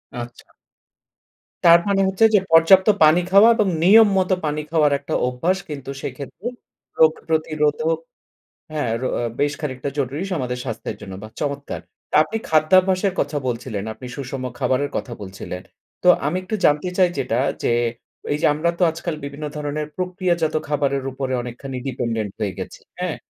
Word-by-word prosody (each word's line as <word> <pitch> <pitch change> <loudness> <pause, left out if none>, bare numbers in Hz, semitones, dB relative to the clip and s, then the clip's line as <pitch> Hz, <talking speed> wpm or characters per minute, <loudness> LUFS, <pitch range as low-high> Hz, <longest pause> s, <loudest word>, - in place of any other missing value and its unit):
আচ্ছা। 120 0 -8 1.2
তার 170 0 +9
মানে 195 -1 +2
হচ্ছে 190 +4 +3
যে - - +7
পর্যাপ্ত 175 +5 +6 0.2
পানি 155 +4 +6
খাওয়া 205 +4 +8
এবং 215 -3 +2 0.2
নিয়ম 215 +5 +8
মত 185 0 +1
পানি 150 0 -1
খাওয়ার 150 -3 +3
একটা 140 - -6
অভ্যাস 165 +10 0
কিন্তু 140 -3 -7
সেক্ষেত্রে 140 - -7 0.5
রোগ 160 -1 +7 0.2
প্রতিরোধক 155 0 +1 0.8
হ্যাঁ 145 -7 -1
রো - - 0 0.3
বেশ 145 0 +2
খানিকটা 130 -3 -4
জরুরী 140 +6 -2
আমাদের 125 -7 -2
স্বাস্থ্যের 110 -3 -5
জন্য 95 - -9
বাহ 110 - -9
চমৎকার! 140 -1 -3 0.3
তা - - -8
আপনি 225 - -5
খাদ্যাভ্যাসের 185 +4 +3
কথা 150 - -2
বলছিলেন, 115 -4 -4
আপনি 125 +3 -10
সুষম 135 -1 -5 0.2
খাবারের 130 +1 0
কথা 120 - -4
বলছিলেন। 95 -1 -7 0.4
তো 180 - +3 0.2
আমি 155 +5 0
একটু 185 +4 -5
জানতে 150 +4 +3
চাই 185 -1 +5
যেটা 120 -3 0 0.2
যে - - +2 0.6
এই 145 - 0
যে - - +5
আমরা 160 +3 +1
তো - - -1
আজকাল 165 +1 -4
বিভিন্ন 140 +2 -6
ধরনের 150 0 -3
প্রক্রিয়াজাত 180 -3 -1
খাবারের 140 -2 0
উপরে 130 0 -3
অনেকখানি 130 +2 -7
ডিপেন্ডেন্ট 115 -5 -2
হয়ে 100 -4 -2
গেছি, - - -7 0.2
হ্যাঁ? - - -2
150 Hz, 155 wpm, -21 LUFS, 130-175 Hz, 1.2 s, তার